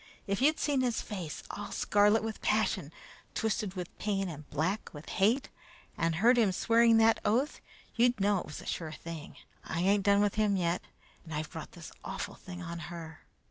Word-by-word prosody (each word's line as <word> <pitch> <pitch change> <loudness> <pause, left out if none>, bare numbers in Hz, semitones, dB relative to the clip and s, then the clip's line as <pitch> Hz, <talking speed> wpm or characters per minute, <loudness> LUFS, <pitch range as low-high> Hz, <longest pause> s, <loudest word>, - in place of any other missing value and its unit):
If 200 +2 -1
you'd 305 +3 +4
seen 285 -3 +2
his 245 -3 +1
face, 180 -8 -5
all 205 - -6
scarlet 210 +2 +3
with 220 -1 -4
passion, 210 -8 +1 0.4
twisted 210 -3 -1
with 180 -2 -6
pain, 195 -3 0
and 150 -2 -9
black 170 +8 -1
with 150 +3 -10
hate, 230 +8 +2 0.5
and 165 0 0
heard 235 +8 +5
him 210 -5 +4
swearing 230 +4 +4
that 225 0 +5
oath, 245 +8 +1 0.3
you'd 240 -1 +3
know 200 0 +3
it - - -7
was 150 - -7
a - - -12
sure 160 -2 -3
thing. 165 -1 -8 0.3
I 170 - -2
ain't 200 +2 +3
done 200 0 +5
with 205 -1 +2
him 205 -2 +3
yet, 170 -1 0 0.4
and 160 -3 -7
I've 155 0 -3
brought 160 - -8
this 170 -1 -10
awful - - -4
thing 180 -1 -9
on 170 0 -5
her." 165 -2 -9
200 Hz, 190 wpm, -31 LUFS, 170-220 Hz, 0.5 s, heard